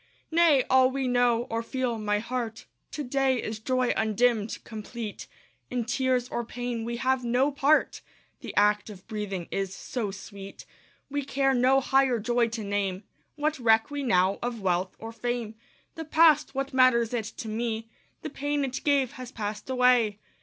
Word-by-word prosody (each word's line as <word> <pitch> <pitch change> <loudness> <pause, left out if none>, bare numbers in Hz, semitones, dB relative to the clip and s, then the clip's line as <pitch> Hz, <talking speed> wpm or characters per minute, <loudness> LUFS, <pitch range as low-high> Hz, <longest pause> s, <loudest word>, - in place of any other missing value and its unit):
Nay! 320 -5 +5
all 260 0 +5
we 265 0 -2
know, 245 -1 +2
or 225 0 0
feel, 240 -1 -2
my 210 -1 0
heart, 230 0 -4 0.2
To 295 - -5
day 265 -1 +1
is 215 -1 -4
joy 255 +2 +1
undimmed, 220 0 +1
complete; 220 0 -7 0.4
In 245 -2 -2
tears 250 0 0
or 240 - -2
pain 240 0 -4
we 235 +1 -3
have 260 +1 +1
no 250 +4 +2
part; 290 +2 +2 0.4
The - - -8
act 210 +1 +3
of 190 -3 -11
breathing 205 -5 -4
is 195 -1 -2
so 220 +1 -4
sweet, 195 0 -10 0.5
We 285 0 -1
care 270 0 +1
no 260 +2 +4
higher 265 -2 +2
joy 240 +2 +1
to 225 -1 -5
name. 200 -1 -2 0.3
What 300 0 -1
reck 225 +2 +3
we 290 0 -3
now 190 -6 +2
of 240 -1 -3
wealth 185 -1 -1
or 225 0 -8
fame? 230 -1 -3 0.4
The 320 - -7
past 310 -2 +4
what 275 0 -2
matters 250 -3 +4
it 230 -3 -1
to 225 - -6
me? 225 0 -3 0.4
The 310 - -5
pain 290 0 -1
it 260 0 -5
gave 280 -4 +2
has 250 -1 -8
passed 210 0 -5
away. 250 -5 +3
240 Hz, 170 wpm, -27 LUFS, 220-260 Hz, 0.5 s, Nay